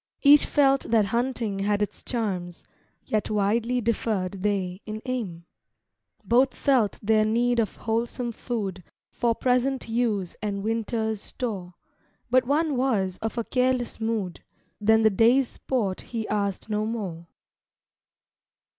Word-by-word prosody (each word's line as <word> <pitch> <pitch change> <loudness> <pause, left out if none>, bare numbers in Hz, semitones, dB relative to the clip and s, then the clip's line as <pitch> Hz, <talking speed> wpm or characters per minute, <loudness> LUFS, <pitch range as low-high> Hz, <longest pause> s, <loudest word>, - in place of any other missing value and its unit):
Each 290 0 +7
felt 275 -2 +3
that 220 -2 +4
hunting 235 -4 -1
had 205 +1 +1
its 205 - -5
charms, 185 -8 -3 0.4
Yet 215 -1 -1
widely 225 +4 +1
differed 205 -4 -1
they 195 -2 -1
in 215 +1 -5
aim. 205 -10 -4 0.8
Both 255 +3 +3
felt 250 -7 +2
their 215 +1 +4
need 235 +2 +2
of 220 - 0
wholesome 235 +2 -2
food 205 -6 -4 0.3
For 235 -1 0
present 255 +2 +1
use 225 -6 -1
and 200 -2 -3
winter's 220 -1 -1
store; 195 -10 -5 0.6
But 255 0 +4
one 300 +1 +1
was 200 -8 0
of 225 +2 -4
a 235 - 0
careless 250 0 0
mood 220 -6 -2 0.4
Than 220 +1 +4
the 220 - +5
day's 235 +6 +4
sport 210 -8 -2
he 225 -2 -5
asked 200 -2 -1
no 215 0 -1
more. 185 -7 -5
220 Hz, 130 wpm, -26 LUFS, 200-245 Hz, 0.8 s, Each